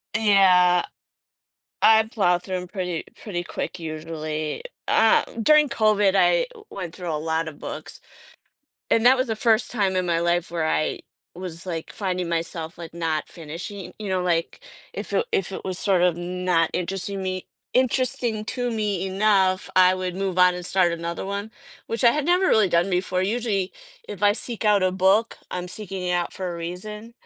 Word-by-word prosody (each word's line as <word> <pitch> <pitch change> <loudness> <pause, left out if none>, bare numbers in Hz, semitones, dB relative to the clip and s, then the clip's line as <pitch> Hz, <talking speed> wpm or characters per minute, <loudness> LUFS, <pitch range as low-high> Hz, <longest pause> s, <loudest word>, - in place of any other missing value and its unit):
Yeah. 185 -5 +5 1.0
I 220 0 +6
plow 180 -6 +2
through 185 0 -5
'em 180 0 -6
pretty 180 -4 -3 0.2
pretty 175 -5 -3
quick, 175 - -5
usually. 155 - -4 0.2
Ah, 225 0 +4 0.2
during 300 +3 +5
COVID, 210 -3 +3
I - - +4
w 440 -3 -15
went 180 -4 -6
through 175 -2 -4
a - - 0
lotta 160 0 -1
books, 155 +5 -8 0.9
and 230 +1 +3
that 260 +1 +7
was 255 -1 -1
the 225 - -1
first 225 +1 +2
time 195 -5 0
in 185 - +1
my 170 -1 +1
life 170 0 0
where 165 -2 -1
I 155 - 0 0.3
was, 175 -1 -8
like, 165 -3 -5
finding 185 -3 -2
myself, 165 0 -3
like, 165 -2 -8
not 165 -2 -2
finishing 175 +4 -8
you 210 -2 -5
know, 185 -1 0
like, 170 -2 -1 0.3
if - - -6
it 470 - +2
if 390 - 0
it - - -6
was, 185 -1 -3
sort 190 -3 +2
of, 175 -2 +3
not 175 -1 0
interesting 190 +2 -2
me 185 -1 -3 0.3
interesting 250 -3 +1
to 245 -1 -2
me 205 -4 -1
enough, 190 -1 +2
I 185 0 +6
would 185 -1 -4
move 190 -2 -2
on 180 0 +6
and 180 - -6
start 180 -1 +2
another 170 +2 -5
one, 200 +2 -4 0.4
which 230 +2 -2
I 235 - +8
had 300 +1 -1
never 360 +3 +3
really 215 -4 +4
done 170 +3 +3
before. 185 0 0
Usually, 205 -2 -1 0.4
if 200 - -8
I 205 0 +6
seek 230 0 -3
out 205 -2 +4
a 185 - +3
book, 195 +5 +2
I'm 180 0 -4
seeking 195 -1 -6
it 180 - -1
out 175 -1 -1
for 185 -2 -4
a - - -6
reason 210 +7 -7
185 Hz, 185 wpm, -24 LUFS, 175-210 Hz, 1.0 s, I